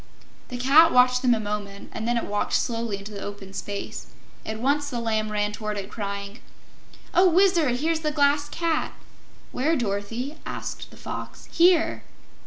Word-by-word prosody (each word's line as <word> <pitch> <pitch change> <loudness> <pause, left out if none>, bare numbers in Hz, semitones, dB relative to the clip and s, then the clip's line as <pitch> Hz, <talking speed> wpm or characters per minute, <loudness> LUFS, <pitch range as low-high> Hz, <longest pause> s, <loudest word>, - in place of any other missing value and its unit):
The 250 - -6
Cat 280 +6 +6
watched 250 0 +5
them 245 -2 +4
a - - -2
moment 205 -1 -5
and 220 - -4
then 240 0 +1
it - - -1
walked 205 0 -2
slowly 230 -3 0
into 200 +2 -9
the 200 -1 -7
open 200 -1 -8
space. 200 +1 -5 0.4
At 220 0 -4
once 285 +4 +1
the 245 -4 -3
Lamb 220 -2 -1
ran 210 0 0
toward 210 0 -4
it, 200 0 -6
crying: 200 +1 -5 0.7
"Oh, 365 +1 +6
Wizard, 345 -7 +4
here's 315 +5 0
the 310 -1 -1
Glass 290 0 +2
Cat!" 330 -1 -1 0.6
"Where, 305 +6 +1
Dorothy?" 230 +5 -3
asked - - -6
the - - -16
Fox. - - -7
"Here!" 340 -1 +4
240 Hz, 170 wpm, -25 LUFS, 205-295 Hz, 0.7 s, Cat